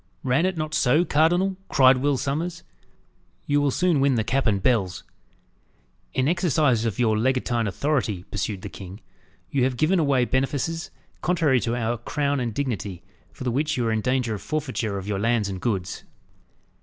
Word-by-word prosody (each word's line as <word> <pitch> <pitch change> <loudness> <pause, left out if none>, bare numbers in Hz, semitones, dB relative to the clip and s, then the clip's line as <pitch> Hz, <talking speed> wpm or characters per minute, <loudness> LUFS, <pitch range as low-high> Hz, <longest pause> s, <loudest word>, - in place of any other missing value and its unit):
Ran 135 +7 +2
it 185 -2 -3
not 155 -1 -3
so, 155 +2 +3
cardinal?" 175 +5 +2
cried 130 -2 +6
Will 140 +1 +1
Sommers. 165 +7 -3 0.8
"You 145 0 +2
will 145 - +2
soon 175 +2 +2
win 135 -1 +3
the 110 - +1
cap 135 +3 0
and 100 -3 +2
bells." 95 -5 0 1.1
"In 130 +1 +2
exercise 150 -8 +2
of 110 -4 -2
your 115 -3 +2
legatine 120 -1 0
authority," 110 -5 -1
pursued 100 -1 -3
the - - -4
king, 95 +1 -10 0.5
"you 135 -3 +1
have 125 -1 0
given 170 +7 +2
away 140 -5 +2
benefices 145 +6 -1 0.3
contrary 160 -7 +2
to 115 0 -1
our 120 -1 -1
crown 145 +3 -1
and 120 -2 -2
dignity, 105 -8 -3 0.3
for - - -9
the 125 - 0
which 150 +3 0
you 120 - 0
are 115 - +1
in 110 -1 0
danger 125 -1 0
of 105 - -5
forfeiture 130 -9 -2
of 95 0 -6
your 100 -2 -1
lands 115 -1 +1
and 95 -2 -5
goods." 95 -7 -2
130 Hz, 180 wpm, -24 LUFS, 110-150 Hz, 1.1 s, cried